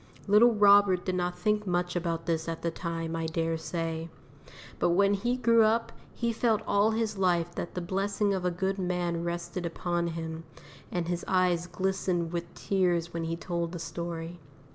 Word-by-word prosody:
Little 220 Hz, +3 st, +6 dB
Robert 200 Hz, -3 st, +5 dB
did 185 Hz, -, -1 dB
not 180 Hz, 0 st, -1 dB
think 210 Hz, +3 st, 0 dB
much 175 Hz, 0 st, 0 dB
about 165 Hz, -1 st, -2 dB
this 165 Hz, -1 st, -1 dB
at 165 Hz, -, -5 dB
the 170 Hz, -, 0 dB
time, 165 Hz, -1 st, -4 dB
I 165 Hz, 0 st, -2 dB
dare 165 Hz, 0 st, -1 dB
say, 165 Hz, 0 st, -3 dB, 0.7 s
but -, -, +3 dB
when 200 Hz, +3 st, +4 dB
he 240 Hz, +5 st, 0 dB
grew 230 Hz, -2 st, +4 dB
up, 225 Hz, +1 st, +2 dB, 0.2 s
he 235 Hz, 0 st, -1 dB
felt 220 Hz, -2 st, +1 dB
all 205 Hz, +2 st, +3 dB
his 220 Hz, -2 st, -1 dB
life 175 Hz, -2 st, +1 dB
that 170 Hz, -, -5 dB
the 180 Hz, -, -2 dB
blessing 200 Hz, +3 st, 0 dB
of 190 Hz, -2 st, -2 dB
a 180 Hz, -, +2 dB
good 190 Hz, +3 st, -2 dB
man 175 Hz, -2 st, -1 dB
rested 175 Hz, +1 st, -3 dB
upon 170 Hz, 0 st, -1 dB
him, 165 Hz, -1 st, -5 dB, 0.5 s
and 175 Hz, -2 st, -2 dB
his 175 Hz, 0 st, -2 dB
eyes 180 Hz, -2 st, +2 dB
glistened 180 Hz, -2 st, -1 dB
with 170 Hz, -1 st, -4 dB
tears 175 Hz, -3 st, 0 dB
when 165 Hz, -1 st, -2 dB
he 165 Hz, 0 st, -2 dB
told 170 Hz, 0 st, -3 dB
the -, -, -4 dB
story. 170 Hz, +1 st, -5 dB
175 Hz, 185 wpm, -29 LUFS, 170-195 Hz, 0.7 s, Little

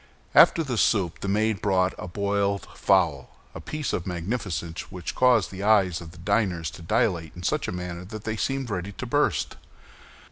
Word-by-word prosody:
After 165 Hz, -, +7 dB
the 125 Hz, -6 st, -2 dB
soup 95 Hz, -7 st, +2 dB
the -, -, -5 dB
maid 105 Hz, +1 st, +1 dB
brought 95 Hz, -2 st, +2 dB
a -, -, -5 dB
boiled 100 Hz, +1 st, -1 dB
fowl—a 80 Hz, -9 st, 0 dB
piece 155 Hz, -2 st, -4 dB
of 85 Hz, -, -2 dB
magnificence 90 Hz, -2 st, -4 dB
which 90 Hz, -2 st, -5 dB
caused 125 Hz, -6 st, +3 dB
the 95 Hz, 0 st, -7 dB
eyes 100 Hz, -5 st, +3 dB
of 85 Hz, -, -9 dB
the 85 Hz, -, -15 dB
diners 90 Hz, -3 st, 0 dB
to -, -, -11 dB
dilate 85 Hz, -4 st, 0 dB
in 90 Hz, -, -9 dB
such -, -, 0 dB
a -, -, -2 dB
manner 90 Hz, -1 st, -5 dB
that 110 Hz, +2 st, -8 dB
they 110 Hz, 0 st, -2 dB
seemed 135 Hz, +1 st, -2 dB
ready 95 Hz, +1 st, -3 dB
to -, -, -6 dB
burst. -, -, 0 dB
95 Hz, 180 wpm, -26 LUFS, 90-110 Hz, -, After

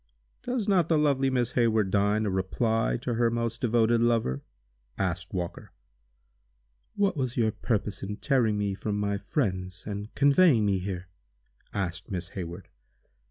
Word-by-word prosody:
"Does 245 Hz, -4 st, -2 dB
not 190 Hz, -4 st, +3 dB
the 160 Hz, -, +4 dB
lovely 140 Hz, -3 st, +2 dB
Miss 125 Hz, -3 st, 0 dB
Hayward 110 Hz, -5 st, +2 dB
deign 105 Hz, +2 st, +2 dB
a 100 Hz, -, 0 dB
reply 110 Hz, +5 st, 0 dB
to 120 Hz, -, -1 dB
her 115 Hz, 0 st, +2 dB
most 115 Hz, 0 st, -2 dB
devoted 115 Hz, -1 st, +3 dB
lover?" 115 Hz, -, +1 dB, 0.6 s
asked 90 Hz, -1 st, -2 dB
Walker. 90 Hz, -2 st, -5 dB, 1.2 s
"What 200 Hz, -2 st, +2 dB
was 130 Hz, -4 st, -2 dB
your 110 Hz, -2 st, +3 dB
purpose 105 Hz, -2 st, -2 dB
in 105 Hz, +1 st, -4 dB
tearing 120 Hz, -7 st, +2 dB
me 100 Hz, -1 st, 0 dB
from 105 Hz, +1 st, -3 dB
my 100 Hz, -1 st, -1 dB
friends, 95 Hz, -5 st, -2 dB
and 105 Hz, +1 st, -5 dB
conveying 140 Hz, -, +5 dB
me 100 Hz, -2 st, +2 dB
here?" 90 Hz, -1 st, -5 dB, 0.6 s
asked 90 Hz, -1 st, -3 dB
Miss 90 Hz, -3 st, -4 dB
Hayward. 90 Hz, -1 st, -7 dB
110 Hz, 150 wpm, -28 LUFS, 95-120 Hz, 1.2 s, conveying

